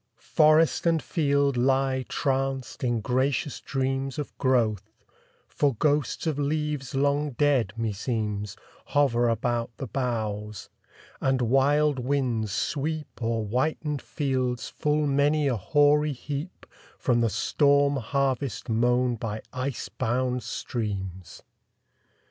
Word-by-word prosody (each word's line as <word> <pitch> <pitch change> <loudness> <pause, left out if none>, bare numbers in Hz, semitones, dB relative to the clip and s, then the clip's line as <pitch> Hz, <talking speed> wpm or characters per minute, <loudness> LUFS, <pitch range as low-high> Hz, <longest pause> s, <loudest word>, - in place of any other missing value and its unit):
Forest 155 +2 +3
and 165 -1 +3
field 140 -4 +1
lie 130 +1 +1
tranced 135 -1 -2
in 120 -3 +1
gracious 130 +4 0
dreams 135 0 -2
Of 150 - -5
growth, 110 -5 0 0.4
for 140 -4 0
ghosts 145 +6 0
of 155 -3 -1
leaves 145 -2 -2
long 145 +1 +1
dead, 135 -7 +2
me 115 -2 -1
seems, 105 -2 -3 0.4
Hover 120 -4 +3
about 115 +1 -1
the 135 - -4
boughs; 105 -5 -3 0.5
and 135 -1 +2
wild 135 +4 +3
winds 125 -5 0
sweep 150 +5 -3
O'er 115 -1 -1
whitened 145 +5 -1
fields 130 -4 -2
full 150 -1 0
many 145 +1 +2
a 130 - +1
hoary 145 +6 +3
heap 145 +6 -6 0.3
From 125 -6 +1
the 115 - +2
storm 140 +4 +2
harvest 135 0 -1
mown 120 +2 +2
by 110 -1 -4
ice 130 -3 -3
bound 125 +3 -1
streams! 95 -6 -5
130 Hz, 115 wpm, -26 LUFS, 115-145 Hz, 0.5 s, Forest